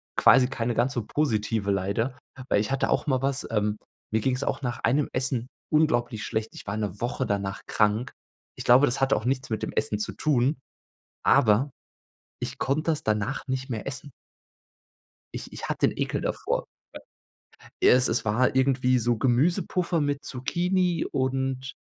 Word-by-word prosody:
quasi 130 -2 +6
keine 120 -2 -2
ganz 125 +3 +1
so 120 -4 -3
positive 110 -7 0
leider, 100 +7 -1 0.3
weil - - +3
ich 110 - -3
hatte 135 - 0
auch - - +1
mal 130 -2 +1
was, 135 0 -1
ähm, 105 -1 0 0.3
mir 110 0 +1
ging's 130 +2 0
auch - - -2
nach 120 -1 -2
einem 140 +5 +2
Essen 125 -2 -1 0.2
unglaublich 120 -8 +1
schlecht. 110 0 -3
Ich - - -9
war 100 +2 -2
'ne 105 -2 -3
Woche 125 +2 -1
danach 100 -1 -2
krank. 105 +3 +1 0.4
Ich - - -6
glaube, 125 +4 +6
das 120 - -1
hatte 135 - +3
auch - - -3
nichts 130 0 -1
mit 110 - -1
dem - - -3
Essen 110 -1 0
zu 105 -2 -3
tun, 135 +4 +1 0.7
aber 115 +6 +4 0.7
ich 125 +2 -5
konnte 155 +4 +1
das 150 - -3
danach 110 +6 -1
nicht 130 0 -3
mehr 115 -1 -4
essen. 135 +1 -6 1.2
Ich - - -7
ich - - -6
hatte - - +2
'n - - 0
Ekel - - -1
davor. - - -2 1.1
W - - +4
ja, - - +8
es 125 +1 +4
es 115 0 0
war 120 +5 +2
irgendwie 130 -1 +3
so 120 0 +1
Gemüsepuffer 165 - +1
mit 145 -1 -1
Zucchini 175 +6 0
und, 130 0 -2
125 Hz, 175 wpm, -26 LUFS, 110-135 Hz, 1.2 s, ja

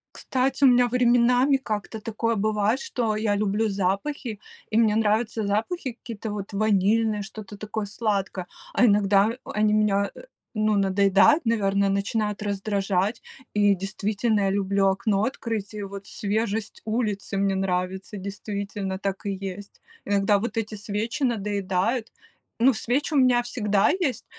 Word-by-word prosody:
Кстати, 265 +1 -1
у - - +9
меня 245 0 +5
временами 250 +2 +4
как-то 215 -3 -4
такое 230 +1 -1
бывает, 215 +3 +1
что 225 -5 -1
я 215 -1 0
люблю 210 +1 0
запахи, 200 +4 -2 0.3
и 215 - +1
мне 220 -2 +4
нравятся 220 0 +1
запахи 230 - -1
какие-то 225 -2 -7
вот 205 0 -5
ванильное, 215 +1 +2
что-то 205 -1 -9
такое 215 0 -4
сладкое, 200 -4 -2 0.3
а 250 - +4
иногда 200 -1 +4
а - - -8
они 210 0 +2
меня, 200 -2 +2
э, - - -10 0.3
ну, 215 -1 +2
надоедают, 195 - +4
наверное, 200 -3 +2
начинают 210 +1 -1
раздражать. 200 0 -1 0.3
И 205 -1 +4
действительно, 205 +3 -1
я 195 - +2
люблю 195 0 +1
окно 195 +1 +1
открыть, 225 -5 -4
и 205 - -4
вот 200 0 -8
свежесть 215 +1 -2
улицы 215 -3 -2
мне 195 0 +1
нравится. 190 +2 -2
Действительно, 200 0 -4
так 195 0 -4
и - - 0
есть. 195 +1 -7 0.3
Иногда 200 0 +2
вот 235 +1 -4
эти 220 -1 -2
свечи 210 +6 -4
надоедают. 205 0 -1 0.5
Ну, 260 +1 +6
свечи 265 +8 -1
у - - +3
меня 250 -2 +4
всегда 210 -4 +1
есть, 260 -9 -1
210 Hz, 145 wpm, -25 LUFS, 200-225 Hz, 0.5 s, у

